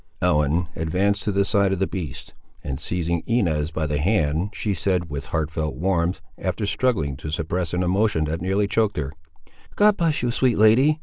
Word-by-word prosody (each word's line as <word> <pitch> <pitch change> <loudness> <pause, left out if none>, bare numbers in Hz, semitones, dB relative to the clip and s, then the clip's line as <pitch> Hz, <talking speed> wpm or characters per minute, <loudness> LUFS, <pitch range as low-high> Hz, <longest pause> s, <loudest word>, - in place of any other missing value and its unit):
Ellen 80 0 +2
advanced 95 +6 0
to 105 - +1
the 100 0 +2
side 100 -1 +2
of 95 - 0
the 95 - +1
beast, 85 -10 -6 0.3
and 65 -1 -4
seizing 85 -1 -1
Inez 85 -10 +1
by 80 -1 -2
the 75 -1 -1
hand, 85 -1 +1
she 105 0 -2
said, 90 -3 -1
with 75 +2 -5
heartfelt 80 -1 -2
warmth, 90 0 0 0.2
after 95 +3 -2
struggling 100 - 0
to 75 +2 -7
suppress 80 +2 -2
an 90 +1 0
emotion 95 -2 +1
that 80 +2 -3
nearly 95 +3 +1
choked 110 -1 +1
her— 70 -1 -3 0.6
"God 210 0 +4
bless 165 -6 +1
you, 120 - +1
sweet 125 -1 +1
lady! 130 +9 +5
90 Hz, 185 wpm, -23 LUFS, 80-105 Hz, 0.6 s, lady